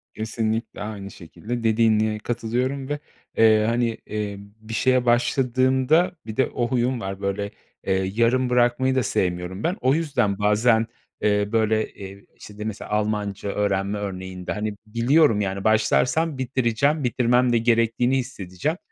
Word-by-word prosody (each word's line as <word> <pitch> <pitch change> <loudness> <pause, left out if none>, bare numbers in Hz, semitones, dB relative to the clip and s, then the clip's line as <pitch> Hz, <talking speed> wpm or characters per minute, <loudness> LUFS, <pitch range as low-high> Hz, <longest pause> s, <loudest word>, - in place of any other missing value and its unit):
Kesinlikle 110 0 -3
aynı 100 -2 -6
şekilde 115 +7 -7
dediğine 110 -1 +2
katılıyorum 125 +4 -2
ve, 145 0 -2 0.4
eee, 110 -1 +5
hani, 115 -1 0
emm, 105 -1 -4 0.2
bir 110 +1 -9
şeye 130 +1 +2
başladığımda 130 +6 +2
Bir 110 -1 -7
de 130 - +3
o 120 - -2
huyum 125 0 0
var, 95 -1 -5
böyle, 100 +1 -2 0.3
eee, 95 0 0
yarım 125 +3 +2
bırakmayı 125 +2 +2
da 130 - +2
sevmiyorum 90 +1 -2
ben. 175 - 0
O 130 +2 +3
yüzden 140 -11 0
bazen, 110 +2 +3 0.3
eee, 105 -1 +1
böyle, 110 -1 +1
eee, 100 0 -10
işte, 105 - -13
d 105 - -5
mesela 110 -2 -6
Almanca 105 -1 -1
öğrenme 100 0 -1
örneğinde, 95 -2 -5
hani, 105 0 -3
biliyorum, 115 +2 +3
yani, 95 -1 -3
başlarsam 125 +8 +2
bitireceğim, 130 +3 0
bitirmem 125 0 +2
de - - +4
gerektiğini 115 +2 +2
hissedeceğim. 125 - -3
115 Hz, 145 wpm, -23 LUFS, 105-125 Hz, 0.4 s, eee